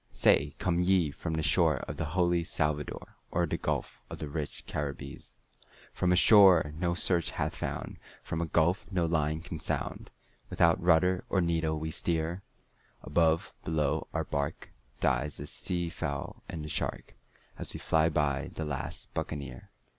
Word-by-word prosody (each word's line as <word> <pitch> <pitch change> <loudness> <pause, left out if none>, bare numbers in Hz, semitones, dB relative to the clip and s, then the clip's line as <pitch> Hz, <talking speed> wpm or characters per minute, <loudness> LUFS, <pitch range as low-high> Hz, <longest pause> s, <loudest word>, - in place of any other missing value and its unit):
Say, - - +3
come 85 -1 0
ye 90 -4 +3
from 80 +2 -4
the 80 - -1
shore 75 - +4
of - - -6
the 80 - -2
holy 85 +1 +1
Salvador, 75 -2 -2
Or 85 0 +1
the 75 - -2
gulf - - -3
of - - -7
the 75 - -5
rich 75 0 -5
Caribbees?" 70 -1 -5 0.6
"From 90 - +1
a - - +5
shore 95 -6 +7
no 85 +1 0
search 85 -1 +2
hath - - -2
found, - - -4 0.3
from 80 - -3
a 85 - -1
gulf 85 +4 +2
no 90 -4 +1
line 80 -1 0
can 85 -2 -6
sound, - - -3 0.4
Without 85 -1 +3
rudder 90 +2 +3
or 95 - +2
needle 80 -2 +1
we 80 +1 -4
steer; 85 +2 -1 0.6
Above, 80 +2 +2
below, 75 -1 0
our 80 - -1
bark, 70 -1 -3 0.3
dies 65 +3 0
the 75 - -6
sea 85 +3 -2
fowl 75 -4 -4
and 80 -2 -5
the - - -5
shark, - - -3 0.4
As - - -5
we - - -5
fly 80 0 +2
by 75 -4 0
the 80 - -3
last 70 -2 -5
Buccaneer. 70 -5 -5
80 Hz, 165 wpm, -30 LUFS, 75-85 Hz, 0.6 s, shore